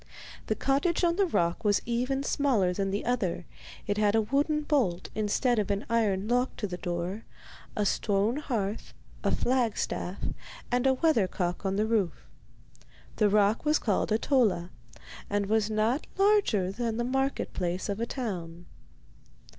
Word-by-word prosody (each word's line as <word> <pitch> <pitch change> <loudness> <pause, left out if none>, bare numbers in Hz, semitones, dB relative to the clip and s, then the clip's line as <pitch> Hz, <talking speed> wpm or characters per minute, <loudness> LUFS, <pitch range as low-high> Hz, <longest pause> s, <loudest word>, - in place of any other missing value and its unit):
The - - +1
cottage 285 +7 +1
on 340 -1 +3
the 395 -2 +3
rock 170 - 0
was 205 -1 +3
even 255 +3 -1
smaller 245 -11 +2
than 195 +1 -1
the 200 +2 -2
other; 200 -8 -1 0.4
it 205 0 -1
had 210 0 +3
a 225 - +4
wooden 290 +6 +1
bolt 240 - 0
instead 220 +3 +1
of 210 - -1
an 200 +1 -1
iron 210 -4 +1
lock 245 +2 +1
to - - -3
the 180 -3 -4
door, 175 +4 -3 0.5
a 210 - 0
stone 205 +4 +1
hearth, 220 -8 -3 0.3
a - - +2
flagstaff, 235 -6 0 0.5
and 250 +2 +2
a 265 - +4
weather 270 - +3
cock 180 +1 -2
on 190 - 0
the 210 +2 +1
roof. 215 -7 0 0.9
The 210 -2 +4
rock 205 +1 +3
was 305 0 +3
called 205 -4 0
Ahtola, 215 -6 +2 0.6
and 205 0 0
was 215 +1 +1
not 220 +6 0
larger 390 - +3
than 230 +1 -2
the 240 - 0
market 270 +2 -1
place 180 0 -2
of 200 +1 -3
a 235 - -1
town. 175 -10 -5
215 Hz, 160 wpm, -28 LUFS, 195-255 Hz, 0.9 s, a